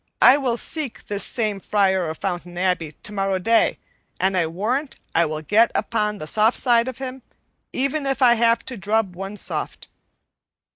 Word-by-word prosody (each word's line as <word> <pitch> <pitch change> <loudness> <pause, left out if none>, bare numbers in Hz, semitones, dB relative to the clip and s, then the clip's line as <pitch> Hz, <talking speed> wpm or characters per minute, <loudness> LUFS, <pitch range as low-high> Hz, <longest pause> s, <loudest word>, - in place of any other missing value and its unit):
I 250 - +9
will 260 -5 0
seek 295 -1 -3
this 205 -2 -2
same 215 -4 -1
Friar 190 -4 +1
of 160 - -5
Fountain 175 -1 -4
Abbey 180 -4 0
tomorrow 195 -2 -1
day, 225 +5 +2 0.4
and 190 +1 +1
I 170 -3 +2
warrant 235 - -2 0.2
I 170 +1 +3
will 155 0 -5
get 220 +7 +4
upon 210 -2 0
the 155 - -6
soft 215 +8 +2
side 235 -1 +3
of 260 - -5
him, 265 0 -6 0.5
even 275 +2 -1
if 270 0 -1
I 250 -3 +6
have 230 0 +2
to 255 - -6
drub 205 -2 0
one 195 +3 -6
soft." - - -4
210 Hz, 175 wpm, -22 LUFS, 185-240 Hz, 0.5 s, I